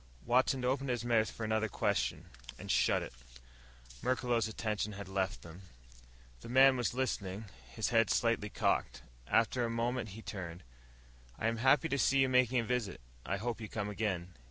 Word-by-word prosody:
Watson 130 +1 +2
opened 135 +1 0
his 120 -2 -1
mouth 115 -2 +2
for 115 - -7
another 110 0 +1
question - - -1 0.3
and - - -4
shut - - +3
it. - - -8 0.9
Merklos' 120 -3 +1
attention 105 -1 -2
had 100 0 -7
left 95 -1 -2
them. 85 +2 -11 0.8
The - - -10
man 130 +2 +6
was 120 -1 -1
listening, 110 -5 -2 0.2
his 95 +10 -2
head 115 -3 +3
slightly 115 -3 +1
cocked. - - 0 0.2
After 115 +2 +2
a 115 - 0
moment 115 0 -1
he 110 - -10
turned. 90 -3 -6 0.7
"I - - -4
am 115 0 +1
happy 130 +5 +4
to 140 -3 -1
see 140 - +3
you 135 -1 +4
making 125 -1 +3
a 120 - +2
visit. 115 -5 -2 0.3
I 100 - 0
hope 115 +3 -3
you 110 - -6
come 105 -2 -3
again." 95 -4 -2
115 Hz, 175 wpm, -33 LUFS, 105-125 Hz, 0.9 s, man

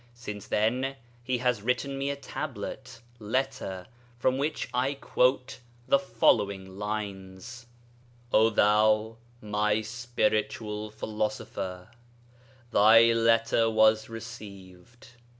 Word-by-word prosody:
Since 105 -4 -8
then 125 +6 0 0.3
he 125 +1 -1
has 125 -3 0
written 125 +4 -1
me 135 +1 -2
a 140 - -2
Tablet 130 -3 -7 0.2
(letter), 105 -5 -3 0.3
from 130 +2 +1
which 150 +3 -2
I 130 +3 0
quote 130 -2 0 0.3
the 140 - +4
following 100 -6 +1
lines: 105 +2 -6 0.7
'O 110 +1 +5
thou, 110 +1 +3 0.3
my 105 +1 +1
spiritual 110 -2 -2
philosopher, 105 -4 -4 0.8
'Thy 115 +2 +6
letter 115 0 +3
was 110 0 +3
received. 105 0 -11
110 Hz, 95 wpm, -28 LUFS, 105-125 Hz, 0.8 s, Thy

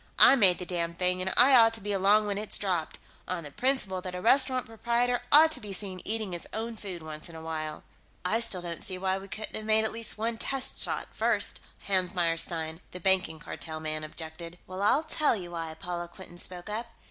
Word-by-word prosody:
"I - - +8
made 195 -8 +6
the 180 - -5
damned 170 -1 -2
thing, 180 0 +2
and 190 +1 -1
I 260 +3 +7
ought 225 -2 +6
to - - -1
be 205 0 -4
along 200 +2 +3
when 205 -1 -2
it's 215 - -2
dropped, 180 -6 -2 0.3
on 180 -2 -3
the 145 - -9
principle 210 - 0
that 180 0 -6
a - - -4
restaurant 255 +4 +3
proprietor 235 +2 0
ought 315 +2 +8
to 270 - +2
be 205 -2 -6
seen 190 -2 -4
eating 215 -2 0
his 175 -1 -5
own 225 +1 -4
food 190 -6 -7
once 155 +1 -8
in 165 - -12
a 160 - -8
while." 155 -1 -5 0.4
"I 215 +5 +2
still 205 -6 +1
don't 170 -2 -5
see 185 -1 -3
why 190 +1 -1
we 195 - -11
couldn't 215 +3 -6
have 215 - -4
made 220 0 +3
at - - 0
least 230 -1 -3
one 225 +1 -2
test 270 -1 +1
shot, - - +2
first," - - 0 0.3
Hans 185 -2 +1
Meyerstein, 165 -1 -1
the 180 - -8
Banking 185 -3 +1
Cartel 155 +1 -4
man, 155 0 -4
objected. 160 +2 -7
"Well, 185 +1 -7
I'll 270 +9 +3
tell 310 -4 +2
you 180 -4 -7
why," 165 -2 -4
Paula 175 +1 -5
Quinton 175 0 -12
spoke 180 +1 -4
up. 220 +3 -3
190 Hz, 225 wpm, -28 LUFS, 170-220 Hz, 0.4 s, I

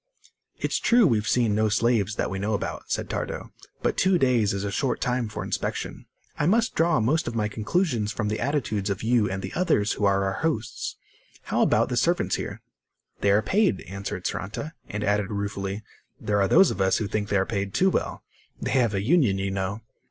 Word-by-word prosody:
"It's - - -1
true 235 -1 +5
we've 110 - +2
seen 120 -4 +2
no 110 +1 +2
slaves, 110 -1 +1
that - - -1
we 95 - -3
know 105 +2 0
about," - - -5
said - - -1
Tardo. - - -4 0.3
"But - - 0
two 185 -1 +4
days 125 -8 +3
is 100 0 -2
a 100 - -2
short 130 +3 0
time 125 -2 -1
for - - -5
inspection. - - -4 0.3
I 150 - +2
must 225 +5 +2
draw 165 -3 +3
most 145 +9 +1
of 120 - -3
my 105 -2 +1
conclusions 110 - 0
from 110 - -2
the 105 +1 -1
attitudes 115 -7 -1
of 100 0 -3
you 115 -3 +2
and 95 0 -4
the 95 - -5
others 110 - +2
who 105 - 0
are 100 0 +3
our 95 0 -2
hosts. 145 -9 -2 0.5
How - - 0
about - - +3
the - - -1
servants - - +1
here?" - - -6 0.6
"They 100 - +2
are 100 +2 +4
paid," 200 - +2
answered 100 -1 -6
Saranta, 125 +10 -4 0.2
and 105 +1 -3
added 100 -1 +1
ruefully: 100 0 -3 0.4
"There 105 -1 0
are 95 - +3
those 190 - +6
of 95 - -3
us 95 0 +3
who 110 - -2
think 105 0 -2
they 100 - +2
are 95 - +2
paid 100 -2 -2
too 185 - +3
well. - - -2 0.4
They - - -3
have 120 -6 +2
a 95 - -1
union, 125 - +3
you 95 0 -2
know." 95 +3 -3
105 Hz, 210 wpm, -25 LUFS, 100-125 Hz, 0.6 s, those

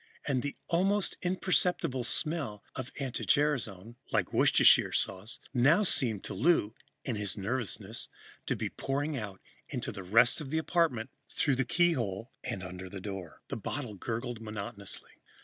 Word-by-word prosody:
And 135 -3 +1
the 145 +1 -4
almost 195 +4 +2
imperceptible 180 -6 +1
smell 140 -9 0
of 130 +1 -5
anti 135 -3 -3
gerasone, 120 -7 +1
like - - +1
Worcestershire - - +6
sauce, 100 +4 -1
now 145 +10 +5
seemed 115 - +2
to - - -5
Lou, 115 - +3 0.3
in 120 -5 -1
his 105 -1 -1
nervousness, 105 +1 -2 0.4
to - - +1
be - - -2
pouring 145 +3 -2
out 105 -6 -5 0.3
into - - -3
the 100 - -7
rest 115 - +4
of 140 - -6
the 160 - 0
apartment, 160 -8 +1 0.2
through 145 - +1
the 135 - +1
keyhole 120 - +1
and 110 -7 -4
under 90 0 -7
the 100 - -7
door. 95 -4 -7
The - - -3
bottle 130 -6 -4
gurgled 115 +3 -4
monotonously. 105 -2 -4
120 Hz, 150 wpm, -31 LUFS, 105-150 Hz, 0.4 s, Worcestershire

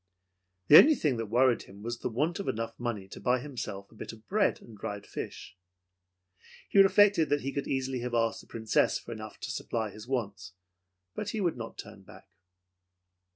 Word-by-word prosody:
The 150 - +11
only 310 +2 +7
thing 140 - 0
that 115 -1 -3
worried 120 +2 +3
him 100 +2 -13
was 120 +1 -4
the - - -2
want 150 - -1
of 200 - -4
enough 115 +1 -2
money 115 -5 -3
to - - -9
buy 125 +1 +2
himself 105 -7 -6
a - - -18
bit 110 - -7
of 110 -1 -15
bread 210 +1 +2
and - - -15
a - - -12
dried 105 0 -5
fish. - - -7 1.1
He 200 - +3
reflected 195 -4 +5
that 145 0 +1
he 135 - -3
could 140 - -3
easily 130 -1 -1
have 120 0 -3
asked 115 -1 +1
the - - -20
Princess 110 -1 +1
for - - -10
enough 110 -2 -8
to - - -4
supply 110 -2 -3
his 110 +3 -11
wants, 100 -8 -3 0.6
but 205 - -4
he 220 - -3
would 175 -4 +1
not 115 -2 -8
turn - - -10
back. 95 - -15
120 Hz, 200 wpm, -29 LUFS, 110-145 Hz, 1.1 s, The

